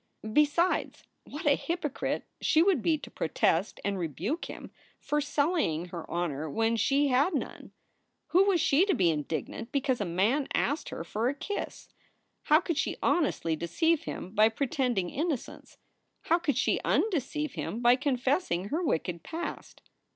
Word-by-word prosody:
Besides, 300 Hz, +6 st, +2 dB, 0.2 s
what 295 Hz, +3 st, -8 dB
a 290 Hz, -, +6 dB
hypocrite 330 Hz, -4 st, -3 dB, 0.2 s
she 315 Hz, -, +4 dB
would 365 Hz, -9 st, +3 dB
be 320 Hz, +3 st, +2 dB
to -, -, -11 dB
protest 165 Hz, +4 st, 0 dB
and 200 Hz, -1 st, -1 dB
rebuke 180 Hz, -, -3 dB
him -, -, -9 dB, 0.3 s
for 295 Hz, 0 st, -1 dB
sullying 285 Hz, -, 0 dB
her 170 Hz, -2 st, -7 dB
honor 160 Hz, -3 st, -2 dB
when 225 Hz, +7 st, +1 dB
she 275 Hz, +5 st, +2 dB
had 280 Hz, +7 st, +3 dB
none! -, -, -5 dB, 0.6 s
Who 375 Hz, +3 st, +5 dB
was 390 Hz, -4 st, +3 dB
she 320 Hz, +1 st, +4 dB
to 390 Hz, -, +2 dB
be 175 Hz, -3 st, +3 dB
indignant 160 Hz, -, -4 dB
because 265 Hz, -4 st, 0 dB
a -, -, 0 dB
man 205 Hz, -, +1 dB
asked 290 Hz, +3 st, 0 dB
her -, -, -5 dB
for 220 Hz, +8 st, -1 dB
a 280 Hz, -, -3 dB
kiss? 410 Hz, +8 st, -5 dB, 0.6 s
How 305 Hz, +1 st, +6 dB
could 335 Hz, -4 st, -2 dB
she -, -, -1 dB
honestly 275 Hz, -, +1 dB
deceive 295 Hz, -, 0 dB
him 185 Hz, -, -6 dB
by 215 Hz, +1 st, +5 dB
pretending 245 Hz, -6 st, -1 dB
innocence? 305 Hz, -4 st, -4 dB, 0.4 s
How 335 Hz, -, +2 dB
could 295 Hz, -7 st, 0 dB
she -, -, +1 dB
undeceive 300 Hz, -, 0 dB
him 230 Hz, -, -4 dB
by 240 Hz, 0 st, +5 dB
confessing 255 Hz, -, 0 dB
her 320 Hz, +8 st, -1 dB
wicked 170 Hz, -, -1 dB
past 335 Hz, -, -7 dB
275 Hz, 160 wpm, -29 LUFS, 190-315 Hz, 0.6 s, a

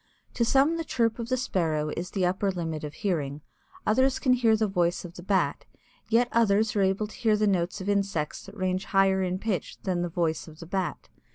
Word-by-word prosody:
To 235 Hz, -, +1 dB
some 275 Hz, +7 st, +3 dB
the 330 Hz, -, -2 dB
chirp 230 Hz, -6 st, 0 dB
of 235 Hz, 0 st, -4 dB
the 255 Hz, -, +1 dB
Sparrow 160 Hz, -10 st, 0 dB
is 175 Hz, +2 st, -4 dB
the 190 Hz, -3 st, 0 dB
upper 185 Hz, +3 st, +1 dB
limit 165 Hz, -4 st, -3 dB
of 150 Hz, -1 st, -6 dB
hearing, 150 Hz, -8 st, -2 dB, 0.4 s
others 260 Hz, +5 st, +3 dB
can 255 Hz, -, +3 dB
hear 235 Hz, -3 st, +4 dB
the 220 Hz, -, +2 dB
voice 175 Hz, -2 st, 0 dB
of 170 Hz, -, -9 dB
the 175 Hz, -, -10 dB
Bat, 190 Hz, +1 st, 0 dB, 0.4 s
yet 235 Hz, +2 st, +4 dB
others 220 Hz, -1 st, +3 dB
are 205 Hz, -, +2 dB
able 195 Hz, +2 st, +1 dB
to 210 Hz, -, -11 dB
hear 220 Hz, -3 st, +2 dB
the 210 Hz, -, +2 dB
notes 185 Hz, -1 st, 0 dB
of 190 Hz, -, -6 dB
insects 195 Hz, -7 st, -1 dB
that 200 Hz, +2 st, -12 dB
range 185 Hz, +1 st, -1 dB
higher 195 Hz, -1 st, +3 dB
in 185 Hz, 0 st, -1 dB
pitch 195 Hz, -5 st, -3 dB
than 185 Hz, -3 st, 0 dB
the 175 Hz, -, -1 dB
voice 165 Hz, -2 st, -1 dB
of 155 Hz, -1 st, -12 dB
the 165 Hz, -, -8 dB
Bat. 185 Hz, +1 st, -3 dB
195 Hz, 220 wpm, -27 LUFS, 175-220 Hz, 0.4 s, hear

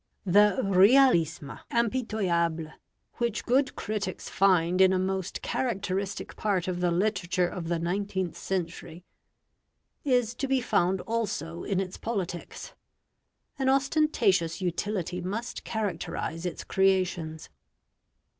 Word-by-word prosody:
The 205 Hz, +1 st, +5 dB
realisme 190 Hz, -, +4 dB
impitoyable 190 Hz, -10 st, 0 dB, 0.4 s
which 235 Hz, -3 st, -1 dB
good 260 Hz, +2 st, +2 dB
critics 205 Hz, -3 st, -4 dB
find 185 Hz, -2 st, +3 dB
in 190 Hz, 0 st, +6 dB
a -, -, +2 dB
most 190 Hz, 0 st, -2 dB
characteristic 200 Hz, -5 st, -2 dB
part 195 Hz, -5 st, 0 dB
of 180 Hz, -1 st, -2 dB
the 180 Hz, 0 st, +2 dB
literature 180 Hz, -1 st, +1 dB
of 175 Hz, -2 st, -6 dB
the 170 Hz, 0 st, 0 dB
nineteenth 185 Hz, +1 st, -2 dB
century, 175 Hz, -1 st, -4 dB, 1.0 s
is 245 Hz, -4 st, +2 dB
to 265 Hz, +3 st, -3 dB
be 265 Hz, 0 st, +2 dB
found 190 Hz, -6 st, +1 dB
also 190 Hz, -8 st, -3 dB
in 195 Hz, -2 st, -1 dB
its 190 Hz, -1 st, -4 dB
politics. 190 Hz, -6 st, -5 dB, 0.9 s
An 265 Hz, -1 st, +2 dB
ostentatious 265 Hz, -, +2 dB
utility 180 Hz, 0 st, -2 dB
must 210 Hz, +7 st, -4 dB
characterise 180 Hz, -4 st, -3 dB
its 175 Hz, -, -5 dB
creations. 185 Hz, -5 st, 0 dB
190 Hz, 110 wpm, -28 LUFS, 175-220 Hz, 1.0 s, in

